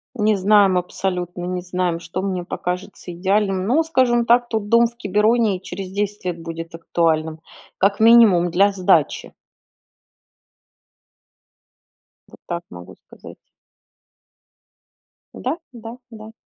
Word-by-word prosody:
Не 215 -2 +2
знаем, 200 -1 +4
абсолютно 180 -1 -3
не 180 0 -3
знаем, 180 -1 -2
что 175 +2 -6
мне 185 -2 -3
покажется 180 +1 -6
идеальным, 195 +1 0
но, 290 +8 +2
скажем 255 -7 +1
так, 240 +1 +3
тот 220 -2 -3
дом 235 +2 +4
в 235 +1 -17
Кибероне 210 0 +1
и - - -17
через 190 0 -7
10 205 0 -4
лет 175 -2 -4
будет 165 0 -7
актуальным, 160 -1 -1 0.4
как 200 +1 +1
минимум, 220 -6 +6
для 195 +4 +3
сдачи. 180 -6 +1 2.9
Вот - - -18
так 170 0 -4
могу 90 0 -12
сказать. - - -14 2.0
Да, 265 +6 -3 0.2
да, 230 0 -10
да. 220 -1 -11
195 Hz, 120 wpm, -20 LUFS, 175-220 Hz, 2.9 s, минимум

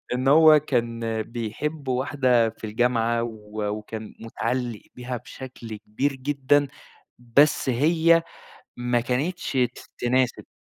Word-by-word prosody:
إنه 130 +2 +1
هو 155 -1 +7
كان 115 -5 -1
بيحب 120 +7 -5
واحدة 130 -3 +2
في 110 0 -15
الجامعة 115 +1 +1
و 110 -2 -7
وكان 105 +1 -6
مِتعلّق 120 0 -3
بيها 125 0 -5
بشكل 120 -2 -9
كبير 135 +8 -2
جدًا، 140 +1 +1 0.5
بس 135 +4 +3
هي 165 +6 +3 0.5
ما 120 0 0
كانتش 135 +9 -2
ت 125 -2 0 0.2
تناسب. 125 0 0
125 Hz, 115 wpm, -24 LUFS, 115-140 Hz, 0.5 s, هو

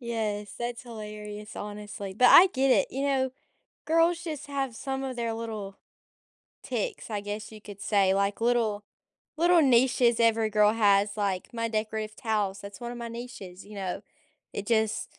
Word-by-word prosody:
Yes, 215 -4 -3
that's 240 0 -4
hilarious, 210 -2 -8
honestly, 205 -1 -6
but 250 +6 +1
I 370 +8 +9
get 270 -5 +1
it. - - +3
You 270 +2 -3
know, 265 -1 +1 0.5
girls 330 +2 +3
just 310 -4 -5
have 270 -4 -3
some 270 0 -3
of 260 -2 -4
their 235 -1 -1
little 215 -4 -6 0.8
ticks, 465 - -4
I 205 -1 -2
guess 205 +1 -6
you 215 - -11
could 205 -1 -11
say, 195 -2 +3
like, 200 +2 0
little 230 -3 +1 0.5
little 345 +1 +5
niches 245 -3 +4
every 225 -1 +3
girl 210 0 +4
has, 205 -2 +3
like 200 -2 -2
my 230 -1 -2
decorative 215 0 -3
towels, 210 -5 -1
that's 200 -1 -10
one 240 0 -5
of 240 - -7
my 235 - -5
niches, 230 -6 -9
you 210 - -11
know? 190 -2 -4 0.5
It 205 - -5
just 220 -1 0
220 Hz, 170 wpm, -28 LUFS, 205-245 Hz, 0.8 s, I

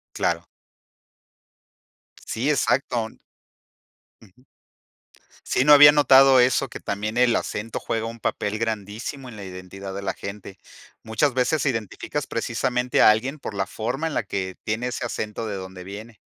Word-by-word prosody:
Claro. - - 0 1.8
Sí, 125 +6 -1
exacto. 130 -5 +1 1.1
Ujú. 110 +4 -21 1.0
Sí, 125 - +1
no 150 0 +8
había 145 0 +10
notado 135 -2 +6
eso, 130 +2 +2
que - - -8
también 105 +3 -3
el 125 -1 +4
acento 110 +2 -3
juega 115 0 -3
un 115 +1 -7
papel 105 -1 -2
grandísimo 110 +4 -4
en 115 - -10
la 100 - -8
identidad 95 +1 -8
de 100 - -4
la 95 -1 -3
gente. 100 -1 -8 0.4
Muchas 120 +5 0
veces 130 +3 +1
identificas 130 +4 -3
precisamente 125 +1 0
a - - +8
alguien 130 +7 0
por 135 - -6
la 100 -1 -2
forma 125 - -3
en 160 - -3
la - - 0
que 95 -2 -4
tiene 110 +3 -2
ese 125 0 -3
acento 110 -1 -4
de 105 -2 -4
donde 95 -1 -8
viene. 105 +4 -9
115 Hz, 150 wpm, -24 LUFS, 100-130 Hz, 1.8 s, había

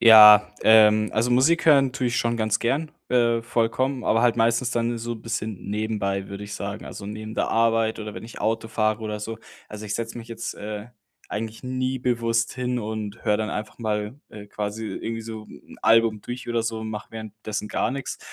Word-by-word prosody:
Ja, 105 -2 +9
ähm, 110 -1 +6
also 115 +3 +1
Musik 150 +8 +3
hören 140 -4 +6
tue 130 -2 -1
ich 120 - 0
schon 120 0 +1
ganz 110 -1 0
gern, 145 +6 0 0.2
äh, 115 -2 +2
vollkommen, 125 +3 0
aber 115 - +3
halt 120 -1 +3
meistens 115 +2 +2
dann 120 0 0
so 115 +1 -4
bisschen 110 -3 -5
nebenbei, 105 -2 -2
würde 100 +1 -7
ich 100 0 -7
sagen. 100 +2 -5
Also 100 - -8
neben 110 +1 -6
der - - 0
Arbeit 115 -1 +2
oder 105 -1 -6
wenn - - -7
ich 115 - -10
Auto 110 0 -1
fahre 110 0 0
oder 105 -1 -3
so. 110 +1 -6 0.3
Also 105 0 -8
ich 105 - -2
setze 115 0 -5
mich 115 -1 -8
jetzt, 115 - -5
äh, 105 +1 -6 0.4
eigentlich 110 +3 -5
nie 130 +1 -1
bewusst 115 -2 0
hin 125 -1 -1
und 110 -1 -5
höre 105 - +3
dann 110 0 -2
einfach 105 0 -5
mal, 105 0 -2
äh, 105 -1 -10
quasi 105 +2 -4
irgendwie 115 +3 -4
so 110 -1 -7
'n - - -14
Album 115 -1 +4
durch 125 0 -7
oder 120 -1 0
so 115 0 -2
und 110 0 -5
mache 105 -1 -7
währenddessen 110 -1 -6
gar - - 0
nix. 135 0 -5
110 Hz, 205 wpm, -24 LUFS, 105-120 Hz, 0.4 s, Ja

